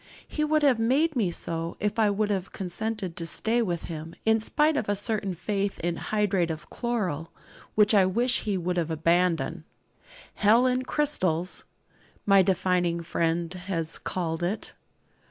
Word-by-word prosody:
He 305 - -2
would 305 0 +2
have 265 -5 +4
made 280 +8 +2
me 215 -7 +1
so, 165 0 -4
if 210 +2 -1
I 215 -2 +4
would 210 +1 0
have 190 -2 -2
consented 195 0 -3
to 165 - -5
stay 230 +7 +1
with 175 -7 -2
him, 165 0 -7
in 220 0 +4
spite 300 +7 +2
of 220 -8 -1
a 205 - +2
certain 205 -2 -1
faith 200 +3 -2
in 170 0 -1
hydrate 200 -5 0
of 160 0 -6
chloral, 185 - -2 0.5
which 210 0 +4
I 195 -3 +5
wish 240 +6 +2
he 205 -3 -1
would 180 0 -1
abandon. 170 +2 +1 0.7
'Hell 225 +4 +4
in 255 0 +2
crystals,' 185 - 0 0.6
my 195 -1 +6
defining 180 -2 +1
friend 165 0 -1
has 175 -3 -2
called 165 -2 -3
it. 180 +5 -3
195 Hz, 155 wpm, -27 LUFS, 170-220 Hz, 0.7 s, my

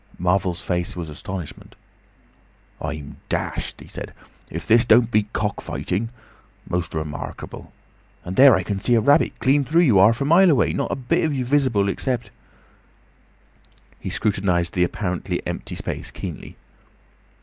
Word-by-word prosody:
Marvel's 90 0 0
face 90 -2 -2
was 85 -3 -5
astonishment. 90 +2 -8 1.1
"I'm 75 -1 -6
dashed!" - - -3
he - - -12
said. - - -8 0.3
"If 85 - -6
this 115 +1 +5
don't 120 0 +4
beat 105 -1 +1
cock 105 -2 -2
fighting! 110 +6 -3 0.6
Most 85 -2 -2
remarkable!—And 80 +3 -8
there 135 +1 +8
I 95 - 0
can 100 +2 -3
see 120 +4 +2
a - - +5
rabbit 140 +7 +3
clean 140 +2 +3
through 160 +6 +3
you, 115 - +5
'arf 110 +5 +5
a 140 - 0
mile 175 +5 +6
away! 145 - +3
Not - - -2
a - - 0
bit 135 +7 0
of 155 -3 0
you 130 -2 -1
visible—except—" 120 -3 0 1.7
He - - -5
scrutinised 95 -5 0
the 90 - +2
apparently 90 0 -2
empty - - -5
space - - -4
keenly. - - -8
105 Hz, 145 wpm, -22 LUFS, 90-130 Hz, 1.7 s, there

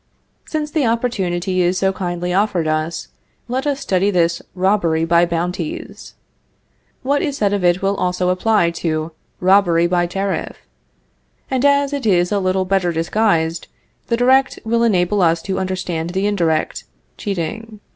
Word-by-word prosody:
Since 300 -1 -3
the 295 -6 +1
opportunity 190 -6 -1
is 180 +1 +1
so 190 +1 +1
kindly 180 -1 -3
offered 190 -4 +1
us, 155 +1 -2 0.4
let 260 +4 -2
us 285 -1 0
study 190 -2 +1
this 170 -3 +1
robbery 180 -4 +1
by 170 +1 +3
bounties. 180 - -4 0.9
What 285 +2 +1
is 285 -3 -2
said 205 -1 +1
of 200 -2 -1
it 175 +2 +2
will 195 +1 +1
also 180 0 0
apply 185 -1 +2
to 155 -1 -1 0.3
robbery 180 -3 +4
by 175 0 +1
tariff, 195 -1 -3 0.9
and 260 -1 0
as 280 0 +3
it 280 -5 -2
is 175 -2 +2
a 205 - +1
little 185 0 0
better 185 -2 +1
disguised, 165 -1 0 0.4
the 235 - 0
direct 260 +2 +3
will 230 +1 +1
enable 200 -3 +2
us 165 -1 +3
to 190 -1 -2
understand 185 -3 -3
the 190 +3 -1
indirect, 170 -7 0 0.3
cheating. 215 +3 -5
185 Hz, 150 wpm, -19 LUFS, 175-220 Hz, 0.9 s, robbery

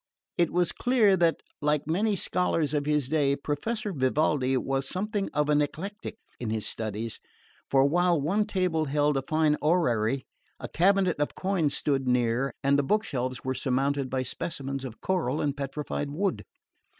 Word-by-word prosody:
It 170 - +2
was 175 0 +1
clear 235 -6 +3
that, 170 -2 +2 0.2
like 150 0 +1
many 200 +7 +1
scholars 165 -6 0
of 145 -1 0
his 150 -3 +1
day, 140 -2 +2
Professor 200 +10 -3
Vivaldi 135 -1 +1
was 135 +1 -1
something 205 +1 -2
of 150 0 +1
an 150 0 +3
eclectic 200 +10 -4 0.2
in 120 - -3
his 110 -1 -1
studies, 110 +1 -4 0.5
for 135 0 +4
while 175 +2 +2
one 195 +9 +1
table 180 -6 0
held 145 +1 +1
a 135 - +1
fine 155 +2 +1
orrery, 135 -6 +1 0.3
a - - -5
cabinet 185 -1 +2
of 145 - -1
coins 185 -7 0
stood 135 -3 0
near, 125 +2 +1
and 140 +1 +3
the - - +2
book 210 +9 +1
shelves 130 - -3
were 130 - 0
surmounted 135 +1 0
by 130 0 -1
specimens 135 0 -4
of 125 -4 -8
coral 160 -7 0
and 145 -2 0
petrified 145 +1 -4
wood. 185 +7 -2
150 Hz, 165 wpm, -27 LUFS, 135-175 Hz, 0.5 s, for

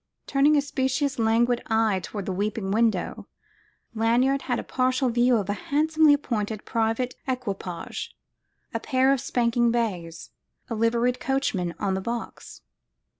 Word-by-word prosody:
Turning 285 +2 +3
a - - +4
speciously 265 -2 -1
languid 235 +2 +2
eye 220 -3 +2
toward 205 0 -6
the - - -2
weeping 200 +1 -2
window, 220 -3 0 0.7
Lanyard 240 +5 +2
had 245 - +2
a - - -4
partial 255 0 +1
view 240 +1 +3
of 200 -3 -2
a 205 - 0
handsomely 305 +7 +3
appointed 220 -6 -3
private 230 +2 0
equipage, 200 -9 -4 0.6
a - - -1
pair 265 -1 +2
of 270 - -1
spanking 235 -1 +1
bays, 185 -9 -3 0.4
a - - +1
liveried 235 +2 +1
coachman 200 -10 -1
on 195 -1 -1
the 190 - -2
box. 235 +3 -6
235 Hz, 140 wpm, -25 LUFS, 210-260 Hz, 0.7 s, a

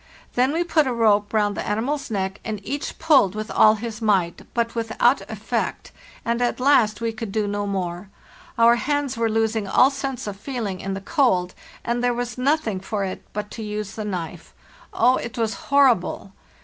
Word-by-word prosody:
Then 255 +2 +2
we 330 +3 0
put 320 -4 +2
a 255 - 0
rope 210 -3 +3
round 210 -2 +1
the - - -3
animal's 260 +7 -1
neck, 195 -2 -2
and 215 -2 -4
each 285 +1 -4
pulled 275 - +4
with 215 +1 -5
all 215 0 +6
his 220 0 -6
might, 190 -6 +1
but 230 -1 0
without 230 +3 +2
effect, - - -3 0.3
and 235 0 0
at 245 +1 0
last 240 -6 +3
we 230 -1 -1
could 220 -2 -6
do 215 0 0
no 205 0 -2
more. 185 -1 -3 0.5
Our 235 +1 +6
hands 285 0 -1
were 230 -1 0
losing 220 -1 0
all 255 +7 +5
sense 270 -2 -4
of 205 -2 -5
feeling 210 -5 -4
in 195 +1 -4
the 195 - -6
cold, 190 - +1 0.3
and 240 +1 -1
there 245 -1 +2
was 245 0 -3
nothing 255 -6 0
for 200 +1 -3
it 190 -1 -4
but 210 0 -5
to 230 - -7
use 210 -1 -4
the 215 - -5
knife. 180 -6 -6 0.4
Oh, 250 +3 +3
it 235 - -6
was 225 -2 0 0.2
horrible! 250 -8 +3
225 Hz, 190 wpm, -23 LUFS, 205-250 Hz, 0.5 s, all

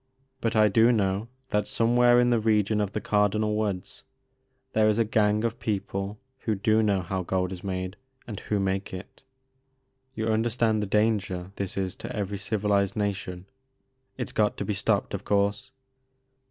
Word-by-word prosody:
But 115 -1 -1
I 110 -1 +6
do 115 +4 +5
know 100 -1 0 0.2
that 105 -3 0
somewhere 120 +1 +4
in 120 0 +3
the 120 - +3
region 105 -1 +2
of 100 -1 -2
the - - -1
Cardinal 105 +1 +1
Woods 100 -4 -3 0.7
there 110 0 +4
is 105 - +2
a 115 - +3
gang 105 0 +2
of 115 -1 -2
people 100 -1 -3 0.2
who 110 -4 -1
do 110 +3 +2
know 100 -4 +1
how 95 +2 -2
gold 90 0 -1
is 90 -1 -7
made, 95 0 -4 0.3
and 105 -4 -6
who 105 - -1
make 95 0 -1
it. 95 - -10 0.9
You 110 - -2
understand 110 0 +1
the 105 - -2
danger 100 -4 0
this 100 -1 -3
is 95 -2 -1
to - - -6
every 100 -1 -3
civilized 100 -1 0
nation. 95 -3 -3 0.7
It 125 - -3
's - - -8
got 105 -1 +1
to - - -3
be 105 - -1
stopped - - 0
of - - -3
course. 100 +5 0
105 Hz, 175 wpm, -27 LUFS, 95-110 Hz, 0.9 s, I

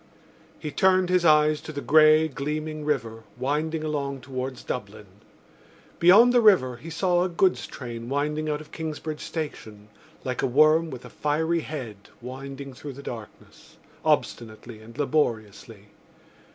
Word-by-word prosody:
He 150 -1 -6
turned 185 +1 +3
his 180 -1 +3
eyes 155 -1 +4
to - - -8
the 145 - -5
grey 155 +1 +5
gleaming 155 +2 -4
river, 115 -7 -2 0.2
winding 155 +5 -1
along 140 -3 -3
towards 130 0 -5
Dublin. 105 -2 -6 0.9
Beyond 210 +8 +7
the 245 - +5
river 175 - +4
he 160 +7 -10
saw 175 +2 +1
a 185 - -1
goods 180 +2 +1
train 120 -2 -7
winding 150 +2 -1
out 150 0 -2
of 155 - -15
Kingsbridge 155 -1 -5
Station, 110 -10 -6 0.3
like 130 -1 -3
a - - +1
worm 155 +5 +4
with 130 -4 -9
a - - -10
fiery 160 +3 0
head 130 -10 -6 0.2
winding 135 +2 -8
through 140 +2 -8
the 140 +2 -11
darkness, 115 -5 -11 0.3
obstinately 115 0 -2
and 115 +3 -14
laboriously. 110 -8 -2
150 Hz, 145 wpm, -25 LUFS, 125-155 Hz, 0.9 s, Beyond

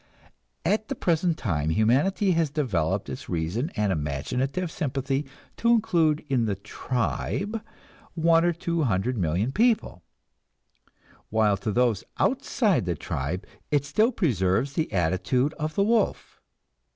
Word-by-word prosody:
At 215 +5 +1
the 275 - -3
present 170 -4 +1
time 80 - -1
humanity 135 - +2
has 165 -3 +2
developed 115 - -1
its - - -7
reason 90 - -1
and 105 -3 +1
imaginative 125 - -2
sympathy 135 -1 -2 0.3
to 235 - +1
include 170 -10 +3
in 125 -5 +1
the 105 -2 -1
"tribe" 130 - -3 0.5
one 165 0 +4
or 175 - +3
two 170 0 -2
hundred 120 -1 0
million 95 +5 0
people; 220 - +1 1.3
while 110 -2 +3
to 110 +3 -3
those 120 -2 +2
outside 240 - +1
the 85 -1 -1
tribe 75 +5 -4 0.2
it 145 -1 +1
still 215 - +2
preserves 130 - +1
the 160 +2 -1
attitude 95 - +1
of 155 0 -3
the 200 - +3
wolf. 225 +2 0
135 Hz, 130 wpm, -26 LUFS, -, 1.3 s, one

